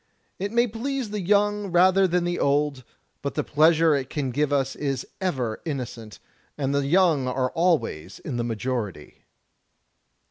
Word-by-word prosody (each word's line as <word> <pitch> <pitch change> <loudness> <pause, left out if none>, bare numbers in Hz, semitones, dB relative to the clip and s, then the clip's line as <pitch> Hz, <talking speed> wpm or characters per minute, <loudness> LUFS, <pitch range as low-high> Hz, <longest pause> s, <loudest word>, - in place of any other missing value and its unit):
It 200 +1 -3
may 235 +1 +3
please 245 +1 -3
the 210 -1 -3
young 205 +2 +2
rather 185 +2 +4
than 180 0 +1
the 175 0 -1
old, 140 -1 +1 0.4
but - - -4
the - - 0
pleasure 160 +1 +4
it 135 -2 -1
can 140 -4 -2
give 145 +2 0
is 135 -1 -1 0.2
ever 130 -12 -2
innocent; 120 -8 -6 0.4
and 140 -1 -1
the 140 -1 0
young 165 -5 +3
are 130 0 -1
always 160 - 0
in 130 -5 -5
the 120 - -1
majority." 115 - -4
150 Hz, 150 wpm, -25 LUFS, 130-185 Hz, 0.4 s, rather